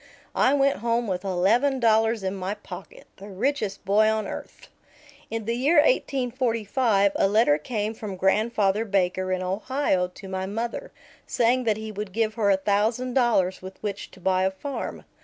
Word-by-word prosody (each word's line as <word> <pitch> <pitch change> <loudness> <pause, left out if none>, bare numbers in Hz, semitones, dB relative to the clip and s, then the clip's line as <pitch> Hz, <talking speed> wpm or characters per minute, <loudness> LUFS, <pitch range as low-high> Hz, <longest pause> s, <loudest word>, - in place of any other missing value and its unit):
I 270 - +3
went 275 0 +2
home 235 +2 0
with 185 -3 -3
eleven 215 +9 +2
dollars 225 -2 +2
in 190 0 -1
my 195 +1 -3
pocket, 475 - -11
the 200 +2 -10
richest 210 0 -2
boy 210 +3 +4
on 220 -1 0
earth. - - -8 0.6
In 225 -1 -4
the 230 - -1
year 280 +7 +2
1845 245 - +2
a - - +3
letter 200 -7 +3
came 215 +5 -3
from 210 -3 -6
Grandfather 205 +2 +1
Baker 185 -3 0
in 185 0 -1
Ohio 195 0 0
to 185 +2 -12
my 190 0 -3
mother, 235 - -4 0.4
saying 250 +1 +2
that 215 -2 +2
he 220 0 -6
would 205 -2 -6
give 220 0 0
her 215 -3 +1
a 195 - +4
thousand 220 +6 0
dollars 230 -8 +2
with 190 +1 -9
which 200 -2 -4
to - - -17
buy 185 0 +1
a 190 - +3
farm. 265 +9 -6
215 Hz, 175 wpm, -25 LUFS, 190-240 Hz, 0.6 s, boy